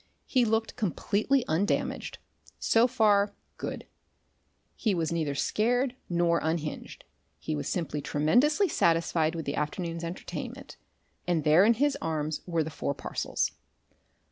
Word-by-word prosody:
He 255 Hz, -3 st, +2 dB
looked 225 Hz, 0 st, 0 dB
completely 220 Hz, -, +1 dB
undamaged 170 Hz, +7 st, -1 dB, 0.4 s
so 230 Hz, +2 st, +4 dB
far, 205 Hz, -4 st, +3 dB, 0.2 s
good; -, -, -5 dB, 0.9 s
he 215 Hz, -4 st, 0 dB
was 165 Hz, -2 st, -1 dB
neither 155 Hz, -4 st, -1 dB
scared 245 Hz, -, +1 dB
nor 170 Hz, -1 st, +2 dB
unhinged, 160 Hz, -1 st, -3 dB, 0.3 s
he -, -, -3 dB
was 75 Hz, -, -3 dB
simply 150 Hz, -4 st, -2 dB
tremendously 250 Hz, -, +3 dB
satisfied 165 Hz, -, +2 dB
with 160 Hz, -2 st, -4 dB
the 140 Hz, -, -2 dB
afternoon's 165 Hz, +3 st, -3 dB
entertainment, 170 Hz, +2 st, -6 dB, 0.5 s
and 170 Hz, -3 st, +1 dB
there 155 Hz, +5 st, +6 dB
in 230 Hz, +3 st, +5 dB
his 280 Hz, +3 st, +1 dB
arms 155 Hz, -1 st, -2 dB
were 165 Hz, -2 st, +1 dB
the 160 Hz, -, -6 dB
four 140 Hz, -2 st, -3 dB
parcels. -, -, -2 dB
170 Hz, 130 wpm, -28 LUFS, 155-225 Hz, 0.9 s, there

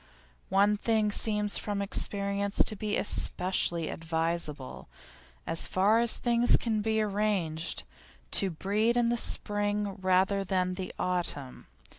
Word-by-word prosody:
One 200 Hz, +2 st, +2 dB
thing 215 Hz, -1 st, 0 dB
seems 210 Hz, -1 st, +2 dB
from 205 Hz, -1 st, -4 dB
experience 200 Hz, 0 st, 0 dB
to 215 Hz, -, -1 dB
be 210 Hz, +1 st, -2 dB
especially 180 Hz, -4 st, 0 dB
advisable 165 Hz, -4 st, -3 dB, 0.6 s
as 165 Hz, -, -1 dB
far 205 Hz, +4 st, +2 dB
as 235 Hz, -1 st, +4 dB, 0.4 s
can 220 Hz, -3 st, -2 dB
be 220 Hz, +1 st, -1 dB
arranged, 195 Hz, -6 st, -2 dB, 0.5 s
to 195 Hz, -, +3 dB
breed 210 Hz, +7 st, -1 dB
in 235 Hz, -1 st, +2 dB
the 240 Hz, -, +1 dB
spring 205 Hz, -2 st, +1 dB
rather 190 Hz, +1 st, +1 dB
than 185 Hz, -1 st, -1 dB, 0.2 s
autumn. 170 Hz, -7 st, -3 dB
200 Hz, 115 wpm, -28 LUFS, 180-210 Hz, 0.6 s, as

